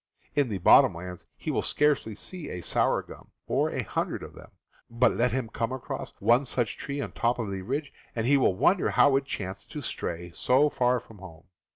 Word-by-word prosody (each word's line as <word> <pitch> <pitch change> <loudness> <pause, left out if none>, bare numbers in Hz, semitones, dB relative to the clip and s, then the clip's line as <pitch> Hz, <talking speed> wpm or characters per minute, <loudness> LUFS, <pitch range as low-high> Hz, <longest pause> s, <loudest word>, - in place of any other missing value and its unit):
In 145 -4 +2
the 100 - -2
bottom 90 - +6
lands 90 +1 -8
he - - -3
will - - 0
scarcely 145 -7 +1
see 180 - -7
a 90 - -5
sour - - +1
gum, - - -13 0.2
or - - +1
a - - -2
hundred - - -3
of - - -9
them; - - -13 0.4
but 120 +2 +3
let 125 +1 +1
him 130 -1 -1
come 115 +2 -3
across 130 -1 -6
one 120 +6 +4
such 120 -4 -1
tree 140 +1 -5
on - - -4
top 120 0 0
of 110 -5 -3
the 95 -1 -4
ridge, 140 +8 -3 0.2
and 115 -1 -1
he 140 +3 +4
will 130 -9 +3
wonder 185 - +3
how 140 -2 +5
it 135 - -2
chanced 95 -7 -6
to 150 - -4
stray 85 -8 -5
so 130 - +3
far 125 -2 +2
from 110 -3 -16
home. 85 -3 -12
120 Hz, 215 wpm, -27 LUFS, 100-140 Hz, 0.4 s, bottom